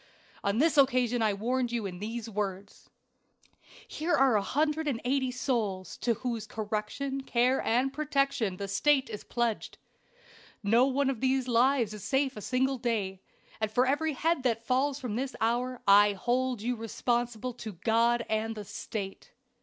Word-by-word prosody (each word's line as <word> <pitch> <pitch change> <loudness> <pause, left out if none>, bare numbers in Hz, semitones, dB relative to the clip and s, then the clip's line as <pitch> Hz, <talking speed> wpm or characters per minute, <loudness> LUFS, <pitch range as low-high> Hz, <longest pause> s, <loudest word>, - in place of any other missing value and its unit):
"On 200 +2 0
this 300 +2 +3
occasion 250 -3 +3
I 215 -2 +2
warned 245 +4 -1
you 235 -3 -2
in 180 -2 -6
these 225 +2 -5
words: 200 -2 -5 1.0
"'Here 330 +2 0
are 270 -3 +4
180 275 +1 0
souls, 225 -7 -2
to 235 -1 0
whose 235 -2 -4
correction, 220 +6 -3
care 255 0 +2
and 255 +4 +1
protection 275 -9 0
the 200 - -4
State 265 +5 +2
is 210 - -6
pledged. 235 -3 -2 0.9
No 230 +6 +4
one 275 0 +1
of 245 - -6
these 260 -1 +1
lives 240 -2 +3
is 210 -3 -8
safe 270 -1 0
a 210 - -7
single 260 +3 0
day; 205 -6 -2 0.4
and 220 -1 0
for 245 +3 +3
every 295 +4 +1
head 325 +1 0
that 230 -3 0
falls 265 +3 +1
from 235 -5 -3
this 265 +1 -3
hour 245 +2 -1
I 205 +1 +7
hold 245 +3 -1
you 245 +1 0
responsible 240 +1 -2
to 220 -3 -7
God 230 +5 +2
and 220 +1 -1
the 210 -1 -7
State.' 200 0 -6
240 Hz, 155 wpm, -29 LUFS, 215-265 Hz, 1.0 s, I